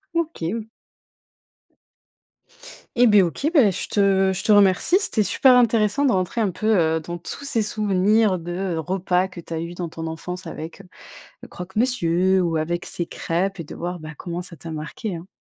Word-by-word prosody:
OK. 315 - -2
O 225 -1 -5 2.3
Eh 245 0 +5
bah, 210 -2 +6
OK. 180 - -2
Bah 265 - +6
je 185 - -4
te 195 -2 +2
je 190 - -4
te - - +2
remercie. 205 - +5
C'était 235 - 0
super 255 +5 +4
intéressant 230 +2 +3
de 260 - +4
rentrer 185 +4 0
un 210 - +2
peu, 215 +4 0 0.2
heu, 160 - 0
dans 170 +2 -7
tous 175 - -7
ces 230 -5 0
souvenirs 210 -1 +2
de 175 +2 -3
repas 180 +2 0
que 185 - -11
tu 170 - -8
as 160 - -2
eu 170 +1 -6
dans 175 -1 -4
ton 165 0 -6
enfance 180 +3 -6
avec, 160 +4 -8
heu, - - -18 0.6
le - - -12
croque-monsieur 190 -2 +1
ou 170 -2 0
avec 170 +2 -2
ces 175 - -4
crêpes 185 +5 -2
et 165 - -5
de - - -9
voir, 175 +1 -5
bah, 155 0 -8
comment 175 0 -5
ça 175 -1 -9
t'a 160 +3 -9
marquée, 160 +6 -5
hein. 170 +3 -9
185 Hz, 190 wpm, -22 LUFS, 170-215 Hz, 2.3 s, bah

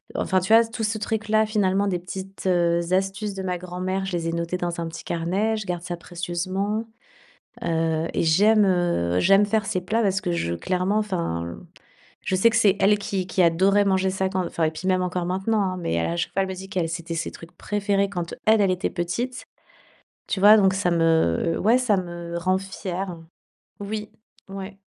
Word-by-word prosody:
enfin, 190 - +1
tu 190 +5 +1
vois, 230 +1 +8
tout 225 0 -5
ce 215 +1 0
truc 220 +1 -2
là, 215 0 +4
finalement. 200 -2 +1
Des 180 -3 -1
petites, 190 +2 -8
heu, 170 -1 +2
astuces 195 +2 -1
de 190 - -5
ma 180 -1 -2
grand-mère, 185 +2 -3
je 195 - -5
les 165 -1 -1
ai - - -3
notées 170 +1 -2
dans 175 -1 -3
un 165 - -3
petit 165 0 -8
carnet, 190 +7 -1
je 215 - -5
garde 175 -1 -2
ça 175 -1 -4
précieusement. 185 +5 -3 0.8
Heu, 165 0 0
et - - +1
j'aime, 205 +6 +4
heu, 175 - +1
j'aime 195 +2 +5
faire 215 0 0
ces 185 -4 -1
plats 220 +6 0
parce 190 -2 +1
que 175 - -2
je 85 - -1
clairement, 185 - 0
enfin, 85 - -3 0.7
je 185 - 0
sais 230 +5 +5
que 220 - -1
c'est 205 -3 +4
elle 205 +2 +5
qui 195 -2 -3
qui 185 0 +1
adorait 190 +5 +4
manger 190 0 +2
ça 190 0 -1
quand 185 -2 -1
enfin, 170 - -3
et 155 - +2
puis 180 +4 -7
même 185 -1 +2
encore 180 -1 -2
maintenant, 195 +4 0
hein. 185 -1 -2
Mais 80 - -2
elle, 85 - 0
à 170 - -2
chaque 175 - -2
fois, 195 - +1
elle 190 - -2
me 190 - -4
dit 190 +1 -9
qu'elle 180 -5 -1
c'était 170 0 -4
ses 165 - -2
trucs 165 +1 -13
préférés 200 -1 0
quand 175 -4 -4
elle, 220 -1 +5
elle 195 -2 +3
était 185 +2 -2
petite, 235 +9 -3 0.8
tu 195 - -2
vois. 210 +2 +9
Donc 190 -2 +4
ça 185 -2 0
me, 165 - +2
ouais, 225 +5 +4
ça 220 -6 +2
me 175 -1 -5
rend 185 +2 +1
fière. 190 -2 -5 0.6
Oui, 210 +1 -5 0.4
ouais. 195 0 -8
185 Hz, 210 wpm, -24 LUFS, 175-205 Hz, 0.8 s, vois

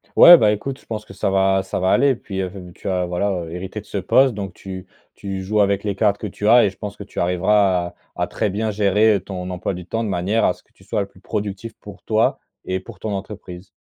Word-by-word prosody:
Ouais, 175 0 +11
bah 105 -6 +4
écoute, 130 +6 -3
je - - -23
pense 105 -2 -5
que - - -12
ça 95 - 0
va 95 0 +3
ça - - -3
va 95 +1 +1
aller, 135 +4 +4
puis, 100 -4 -6
heu, 95 -1 -3 0.2
tu - - -9
as 90 -1 0
voilà, 90 +3 0
heu, 80 - -9
hérité 95 +4 -6
de - - -22
ce - - -5
poste, 125 +6 +3
donc 100 -3 -5
tu 95 -1 -8 0.3
tu 95 -1 -5
joues 105 +3 0
avec 100 -1 +2
les 100 -2 -2
cartes 100 0 +2
que 105 - -4
tu 105 +2 -4
as 120 +1 +7
et - - +2
je 95 - -15
pense 105 -1 -7
que - - -7
tu 100 - -8
arriveras 90 0 +2
à - - -13 0.2
à - - -1
très 105 -3 -1
bien 110 +3 -1
gérer, 105 +1 +3
heu, - - 0
ton 90 -2 -6
emploi 90 +2 -3
du 90 0 -8
temps 115 +1 -2
de 110 - -2
manière 95 +5 +1
à - - +3
ce - - -21
que - - -38
tu - - -22
sois 105 +2 -1
le 100 - -3
plus 95 - -21
productif 105 +2 -4
pour 105 -1 -12
toi 110 0 +1 0.3
et 95 0 -1
pour 110 +4 -13
ton 110 - -4
entreprise. 95 -2 -7
100 Hz, 275 wpm, -21 LUFS, 95-105 Hz, 0.3 s, Ouais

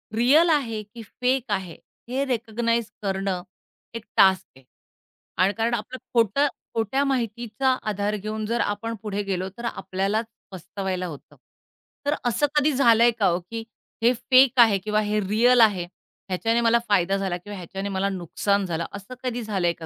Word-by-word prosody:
Real 285 +9 +5
आहे 240 -9 +1
की 210 +3 -12
fake 250 +2 -1
आहे. 190 -4 -3 0.3
हे 265 +3 0
रिकॉग्नाइज 230 -1 -1 0.2
करणं 195 -2 -2 0.5
एक 230 - -6
टास्क 190 -1 +5
आहे, 135 - -19 0.7
आणि 185 +3 +3
कारण 230 +2 -1
आपलं 240 +3 -4 0.2
खोटं 235 +5 +3 0.3
खोट्या 225 +5 0
माहितीचा 240 -1 -1 0.2
आधार 205 +1 -1
घेऊन 215 +1 -4
जर 230 +2 -1
आपण 205 +3 -2
पुढे 205 -1 -2
गेलो 190 -1 -2
तर 235 - -6
आपल्यालाच 195 +1 -2 0.3
पस्तवायला 185 0 -4
होतं. 150 -5 -11 0.7
तर 290 +1 +1
असं 245 +4 +2
कधी 295 +1 +3
झालंय 235 -3 +5
का 205 - +4
हो? 175 0 +1
की 225 +6 -7 0.4
हे 240 +2 +5
फेक 255 +1 +4
आहे, 225 -4 +7
किंवा 210 +2 -1
हे 210 0 0
रिअल 230 +5 +4
आहे. 200 -6 +4 0.4
ह्याच्याने 225 +6 +1
मला 235 0 +4
फायदा 195 -1 +2
झाला, 190 -3 -2
किंवा 205 +3 -9
ह्याच्याने 195 +3 -5
मला 195 0 0
नुकसान 195 +2 -1
झालं. 170 -2 -2
असं 200 +4 -8
कधी 245 -1 -2
झालंय 190 -5 0
का 165 - -10
215 Hz, 165 wpm, -24 LUFS, 195-235 Hz, 0.7 s, आहे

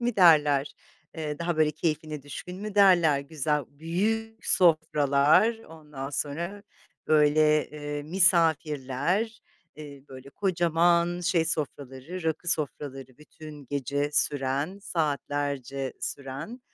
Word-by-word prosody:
mi 240 -2 -2
derler, 150 -5 +4 0.4
eee, 150 -2 -5
daha 170 -1 -2
böyle 155 -1 +3
keyfine 155 -1 -3
düşkün 180 +5 -8
mü 210 -1 -6
derler, 175 -8 +5
güzel, 150 0 -2
büyük 215 +9 -3
sofralar, 155 +4 +3
ondan 150 -8 -9
sonra 170 +8 -4 0.4
böyle, 150 0 +3
eee, 145 -1 -5
misafirler, 165 - +1 0.4
eee, 145 -3 -11
böyle 130 +1 -12
kocaman 170 0 +1
şey 175 -2 +1
sofraları, 145 +1 -5
rakı 160 +2 -2
sofraları 135 -5 -3
bütün 150 -1 -12
gece 145 +2 -2
süren, 145 +6 0
saatlerce 145 - -3
süren 140 - -6
155 Hz, 105 wpm, -27 LUFS, 140-175 Hz, 0.4 s, derler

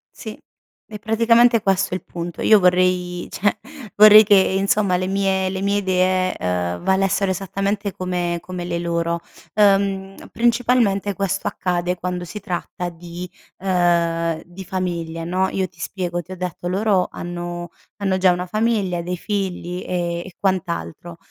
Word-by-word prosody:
Sì, - - -8 0.5
è 210 -1 -8
praticamente 230 +1 +4
questo 195 -1 +1
il 185 - -3
punto. 170 -1 -6
Io 215 - +6
vorrei 180 -1 +1
cioè 205 +1 0 0.4
vorrei 215 +1 +9
che 205 -1 +5
insomma 195 0 +2
le 185 - -2
mie 190 -1 +1
le 190 0 -4
mie 200 +1 +1
idee, 185 -1 +1
uhm, 90 -1 -2
valessero 195 0 +1
esattamente 195 +2 -2
come 180 -2 -2
come 180 0 -6
le 170 -1 -2
loro. 170 0 -1 0.4
Uhm, 195 -2 +2 0.2
principalmente 230 -4 +2
questo 195 0 -2
accade 180 0 -1
quando 180 0 -3
si 210 +5 -7
tratta 180 -1 -4
di 175 +1 -9 0.3
ehm, 170 -3 +1
di 175 +2 -10
famiglia, 170 -3 -3
no, 185 +2 0
io 190 -1 -1
ti 165 - -26
spiego 175 -1 -3
ti 175 +2 -15
ho 185 - -6
detto 180 -1 -5
loro 195 0 +1
hanno 175 0 -6 0.3
hanno 195 -2 0
già 185 -1 +4
una 180 0 -2
famiglia, 210 -4 0
dei 180 +1 -4
figli 185 -3 -3
e 175 -1 -2
e 185 - -12
quant'altro. 175 -3 -3
185 Hz, 150 wpm, -21 LUFS, 175-195 Hz, 0.5 s, vorrei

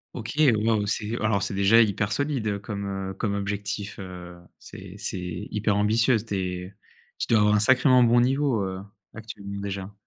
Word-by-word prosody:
OK, 115 -2 -5 0.3
waouh! 110 -3 +2
C'est 110 +3 -1
alors, 105 -3 +1
c'est - - -2
déjà 100 +4 +5
hyper 100 -1 0
solide, 140 -1 -1
heu, 100 -1 -1
comme, 100 -1 -5 0.3
heu, - - -7
comme 100 +1 -2
objectif, 100 +1 -4
heu, 90 -2 -9 0.2
c'est - - -11
c'est 90 +2 -5
hyper 105 -1 0
ambitieux. 115 +4 +3
Tu 105 -1 -5
es 90 0 -4 0.4
tu - - -3
dois 115 -2 +4
avoir 105 0 +4
un - - +3
sacrément 130 +1 +5
bon 120 +1 +4
niveau, 130 -2 +1
heu, 95 0 -4 0.3
actuellement 100 -3 -8
déjà? 100 0 -5
105 Hz, 180 wpm, -25 LUFS, 100-115 Hz, 0.4 s, déjà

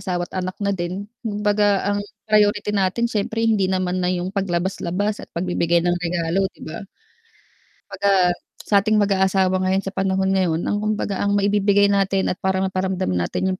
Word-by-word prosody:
asawa 180 -1 -2
at - - -16
anak 185 0 -5
na 200 - +1
din, 175 0 -2 0.3
kumbaga 210 -1 +1 0.2
ang 205 0 +1 0.3
priority 210 -1 +3
natin 195 +4 +1
siyempre 220 +1 -1
hindi 215 -4 +2
naman 185 -1 0
na 180 - +1
yung 180 +1 -2
paglabas-labas 190 +2 -1
at - - -11
pagbibigay 170 -1 +1
ng 175 0 +1
regalo 175 +2 0
'di - - -18
ba? 160 +5 -7 1.1
Kumbaga, 200 0 +1 0.5
sa 205 - 0
ating 215 +2 +1
mag-aasawa 190 -1 +2
ngayon 190 +1 +1
sa 195 - -4
panahon 190 0 0
ngayon 175 -4 +1
ang 205 - -1
kumbaga 210 -2 -2
ang 200 0 +1
maibibigay 200 0 +3
natin 195 -1 +1
at 180 - -5
parang 190 0 0
maparamdam 190 - -1
natin 90 - -1
yung 185 - -4
190 Hz, 170 wpm, -21 LUFS, 185-205 Hz, 1.1 s, priority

